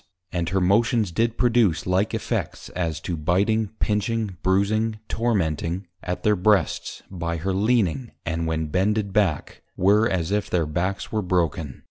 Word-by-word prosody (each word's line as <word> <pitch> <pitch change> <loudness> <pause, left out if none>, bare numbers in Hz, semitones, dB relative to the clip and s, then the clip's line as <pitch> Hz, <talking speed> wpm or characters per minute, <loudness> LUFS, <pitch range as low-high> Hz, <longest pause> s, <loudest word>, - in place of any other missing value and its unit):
And 85 -1 -1
her 95 +2 +1
motions 105 +2 +2
did 115 +6 0
produce 120 -8 +2
like 95 +5 +1
effects, 110 - -3
as 80 -3 -2
to 90 - -3
Biting, 100 +8 +1
Pinching, 105 -1 0
Brusing, 105 +4 +1
Tormenting, 95 -5 -1 0.2
at 90 0 -4
their 105 -1 +4
Breasts, 100 +2 +1
by 85 -2 -3
her 95 +4 -2
Leaning, 110 +3 +1 0.2
and 85 0 -1
when 80 0 -1
bended 100 +3 0
back, 95 -8 0 0.2
were 105 +4 +4
as 90 -1 -1
if 105 0 0
their 85 -3 +1
Backs 90 +6 -2
were 110 - 0
broken. 85 -6 -1
95 Hz, 150 wpm, -24 LUFS, 85-110 Hz, 0.2 s, their